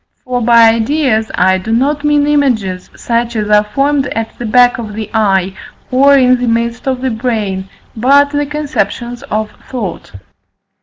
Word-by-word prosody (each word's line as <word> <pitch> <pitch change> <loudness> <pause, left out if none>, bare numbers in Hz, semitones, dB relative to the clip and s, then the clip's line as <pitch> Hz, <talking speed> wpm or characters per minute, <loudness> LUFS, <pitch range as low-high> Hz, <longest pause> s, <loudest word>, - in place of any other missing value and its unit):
For 250 -1 -2
by 230 -1 +5
ideas 230 -1 0
I 185 +1 +2
do 215 +4 -5
not 280 +5 0
mean 295 -1 +2
images 240 -11 0
such 235 0 -2
as 210 -1 -2
are 210 0 +5
formed 275 +5 0
at 225 -2 -4
the 240 - -4
back 245 +2 +3
of 215 -3 -6
the 220 -1 -6
eye, 195 -3 +1 0.4
or 275 +2 +5
in 255 -1 +4
the 245 - -2
midst 235 +2 -2
of 260 -1 -1
the 260 -1 -1
brain, 215 -5 -3 0.3
but 280 +5 +3
the 290 0 -1
conceptions 245 -5 -3
of 215 0 -2 0.2
thought. 210 - -6
235 Hz, 165 wpm, -13 LUFS, 215-270 Hz, 0.4 s, by